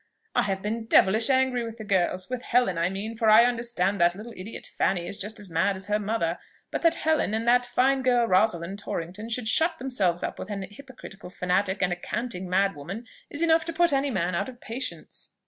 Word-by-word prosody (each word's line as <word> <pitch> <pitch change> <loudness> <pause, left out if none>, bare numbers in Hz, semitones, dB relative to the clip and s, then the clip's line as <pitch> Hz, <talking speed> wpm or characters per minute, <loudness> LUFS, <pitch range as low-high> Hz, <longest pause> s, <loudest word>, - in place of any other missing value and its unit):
"I - - +3
have 195 -1 -2
been 225 +2 -3
devilish 220 +2 +4
angry 260 -2 +2
with 230 0 -7
the 220 - -7
girls, 185 -2 +1
with 255 -1 -4
Helen, 245 -8 +2
I 170 +1 +1
mean, 205 +4 -5
for 225 -1 +2
I 220 +2 +8
understand 230 -6 0
that 175 0 +4
little 225 +4 -9
idiot, 190 +5 -8
Fanny, 180 -3 +1
is 200 - -4
just 215 +3 -3
as 200 -4 -4
mad 165 +5 +1
as 190 +2 -3
her 210 0 +2
mother; 200 -5 -1 0.3
but - - -2
that 335 -1 +4
Helen, 315 -10 +1
and 225 +1 -2
that 245 +1 +4
fine 265 +2 +2
girl, 245 -2 +3
Rosalind 185 -2 +1
Torrington, 195 +3 -5
should 235 0 -2
shut 325 +8 +2
themselves 195 - -1
up - - -4
with 185 - -6
an 200 -2 -4
hypocritical 205 -4 -11
fanatic 190 +2 0
and 180 -1 +1
a - - -5
canting 190 -2 -4
mad 195 +1 +2
woman, 185 +11 -7 0.2
is 295 +3 -2
enough 325 0 +4
to 335 - -4
put 345 -1 +3
any 275 +1 +1
man 185 -6 -1
out 170 - -1
of 245 -2 -12
patience." 245 +3 -6
215 Hz, 220 wpm, -26 LUFS, 190-245 Hz, 0.3 s, I